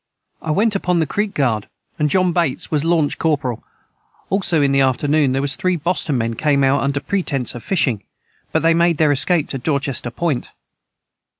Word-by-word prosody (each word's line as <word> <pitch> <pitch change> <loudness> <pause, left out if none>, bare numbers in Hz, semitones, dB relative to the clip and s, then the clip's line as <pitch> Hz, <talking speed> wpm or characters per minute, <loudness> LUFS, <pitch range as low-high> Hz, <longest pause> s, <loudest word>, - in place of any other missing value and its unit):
I 160 - -6
went 210 +8 +2
upon 180 -2 0
the 160 - +2
creek 205 +6 -2
guard 115 -7 0 0.3
and 150 -1 +2
John 185 +1 +2
Bates 165 -7 -1
was 150 -2 +1
Lanch 165 -3 +1
corporeal 140 -7 -1 0.7
also 190 -4 +1
in 140 - +2
the 135 0 +3
afternoon 140 +2 +2
their 135 +1 -1
was 140 -1 +2
3 185 +4 0
Boston 165 -3 -1
men 115 -1 -1
came 140 +3 +1
out 135 +1 +2
under 140 +1 0
pretence 145 -8 -2
of 120 - -8
fishing 130 - 0 0.5
but - - 0
they 165 0 +4
made 170 -1 +2
their 155 -1 +3
escape 145 +3 +2
to 135 - -4
Dorchester 140 -2 -1
point. 145 +1 -3
150 Hz, 185 wpm, -19 LUFS, 135-170 Hz, 0.7 s, they